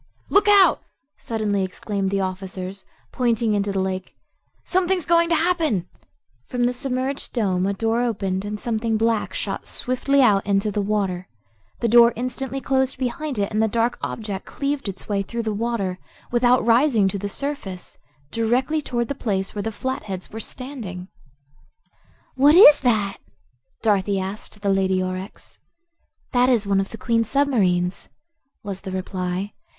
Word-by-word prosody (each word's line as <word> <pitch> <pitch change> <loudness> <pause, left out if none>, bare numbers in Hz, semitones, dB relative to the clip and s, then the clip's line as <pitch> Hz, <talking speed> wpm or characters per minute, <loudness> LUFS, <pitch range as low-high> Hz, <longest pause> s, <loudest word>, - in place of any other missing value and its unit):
"Look 405 +1 +4
out!" 405 -2 +6 0.4
suddenly 210 -3 -1
exclaimed 195 +1 -3
the 195 0 0
officers, 190 0 -5 0.3
pointing 235 -3 +1
into 200 0 0
the 195 - -1
lake; 190 -1 -3 0.5
"something's 370 -1 0
going 335 0 +3
to 335 - +3
happen." 315 - +1 0.6
From 245 -1 -1
the 245 +1 +2
submerged 260 +1 -3
dome 190 -6 +1
a 200 - 0
door 225 +3 0
opened 195 -5 -1
and 210 0 -4
something 225 -1 -1
black 225 0 0
shot - - -4
swiftly 270 +2 +1
out 205 -5 +4
into 200 +1 +1
the 205 - -1
water. 195 -3 -1 0.5
The 235 - +2
door 235 +1 +7
instantly 260 +2 -3
closed 265 0 0
behind 260 +2 -3
it 200 -1 -1
and 215 0 +1
the 220 - +3
dark 230 +2 0
object 205 -3 -5
cleaved 280 -5 -2
its 195 - -8
way 200 -2 0
through 235 +4 -4
the 220 -1 -1
water, 205 -4 -2 0.3
without 245 0 +3
rising 235 -3 +4
to 200 - -3
the 205 +1 -3
surface, 245 -8 -5 0.3
directly 250 +7 +1
toward 240 -4 -2
the - - -2
place 195 -7 -2
where 205 - -3
the 225 - -3
Flatheads 215 -6 -5
were 225 - -6
standing. 220 -8 -6 1.2
"What 285 +4 +5
is 300 -6 +9
that?" 215 -6 +1 0.6
Dorothy 200 -2 +2
asked 200 +2 -6
the 200 -1 +2
Lady 190 -1 +1
Aurex. 185 +1 -6 0.7
"That 250 0 +3
is 235 -5 +2
one 200 -1 +2
of 195 - -1
the 225 - -8
Queen's 230 -2 0
submarines," 195 -11 +1 0.5
was 195 -2 -5
the 190 - -6
reply. 185 +1 -3
220 Hz, 155 wpm, -23 LUFS, 195-255 Hz, 1.2 s, is